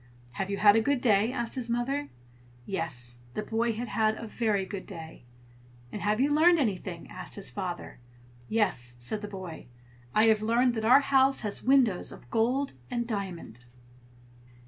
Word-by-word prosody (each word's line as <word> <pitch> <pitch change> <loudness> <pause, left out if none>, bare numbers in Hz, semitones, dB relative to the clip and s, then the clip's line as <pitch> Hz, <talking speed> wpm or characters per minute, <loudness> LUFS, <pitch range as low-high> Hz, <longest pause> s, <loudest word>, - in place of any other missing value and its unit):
"Have 195 +9 -4
you 200 - -2
had 205 0 +6
a 225 - +4
good 280 +3 +1
day?" 220 -1 +3
asked 235 -3 -2
his 250 -3 -2
mother. 270 +5 -1 0.6
Yes, 125 -10 -1 0.2
the 215 - -2
boy 230 +2 0
had 235 +2 -5
had 220 -1 +1
a - - -7
very 215 -3 0
good 190 0 -7
day. 160 -6 -10 0.7
"And 210 - -6
have 210 +2 +1
you 285 +3 +3
learned 340 +3 +5
anything?" 190 - -2
asked - - -6
his 200 - -4
father. 180 -9 -5 0.5
"Yes!" 175 - +1
said 120 - -3
the 210 - -5
boy. 185 -8 -8 0.5
"I 215 - +5
have 220 -1 +4
learned 235 +3 +2
that 220 -2 -2
our 250 +5 +7
house 270 -1 +3
has 210 -2 -3
windows 250 -8 +3
of 120 - -14
gold 255 +5 +1 0.2
and 235 -1 -2
diamond." 185 - -5
215 Hz, 170 wpm, -28 LUFS, 190-240 Hz, 0.7 s, our